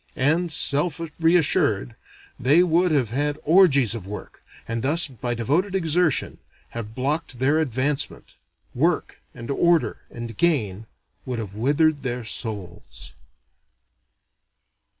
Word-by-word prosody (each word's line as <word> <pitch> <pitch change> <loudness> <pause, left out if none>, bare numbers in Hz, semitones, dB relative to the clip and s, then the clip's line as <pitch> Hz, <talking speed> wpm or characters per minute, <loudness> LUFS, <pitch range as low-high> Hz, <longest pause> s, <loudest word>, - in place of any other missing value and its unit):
And, 160 +6 +1
self 150 +2 +1 0.2
reassured, 165 - +2 0.4
they 145 +8 +5
would 175 +1 +2
then 155 - +2
have 120 -6 -1
had 145 +3 -1
orgies 145 - +5
of 105 -5 -7
work; 105 +1 -9 0.2
and 115 0 -2
thus, 155 +7 +2
by 120 -2 -4
devoted 160 - 0
exertion, 170 -3 +1 0.3
have 110 -1 -7
blocked 140 +1 -2
their 140 +5 +2
advancement. 140 0 -1 0.4
Work, - - -1
and 115 +3 -6
order 170 +3 +2
and 120 -1 -8
gain 110 - 0 0.4
would 125 -2 -4
have 105 -4 -6
withered 145 +7 +1
their 125 -2 -3
souls. 105 -6 -6
140 Hz, 120 wpm, -23 LUFS, 115-160 Hz, 0.4 s, they